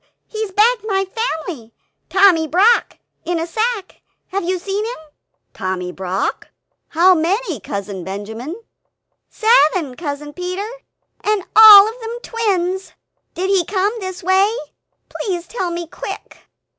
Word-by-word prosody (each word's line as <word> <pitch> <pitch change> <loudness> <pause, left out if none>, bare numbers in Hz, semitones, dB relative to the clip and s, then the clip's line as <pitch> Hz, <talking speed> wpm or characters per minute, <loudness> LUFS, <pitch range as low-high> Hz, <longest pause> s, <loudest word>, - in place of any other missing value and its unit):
He's 435 -2 -5
bagged 450 +4 +3
my 390 -2 0
family 320 - -5 0.3
Tommy 370 -5 +4
Brock 395 +10 +3 0.3
in 345 -1 -2
a 330 - -2
sack 435 +3 -3 0.3
have 395 0 -2
you 365 +2 -1
seen 395 +3 -3
him?" 470 +3 -5 0.6
"Tommy 185 -1 -4
Brock? 190 +1 -3 0.4
how 350 +3 +4
many, 365 +9 -1
Cousin 200 -2 -6
Benjamin?" 220 - -6 0.7
"Seven, 370 - +3
Cousin 295 0 -6
Peter, 365 +4 -4 0.6
and 420 -2 0
all 425 -2 +11
of 455 +3 -7
them 460 0 -6
twins! 380 -6 -2 0.4
Did 375 +3 -1
he 380 -3 +3
come 390 +4 0
this 375 -2 -6
way? 380 +3 +3 0.6
Please 355 -5 -4
tell 375 -7 -3
me 340 0 -4
quick!" 325 - -9
370 Hz, 130 wpm, -18 LUFS, 320-420 Hz, 0.7 s, all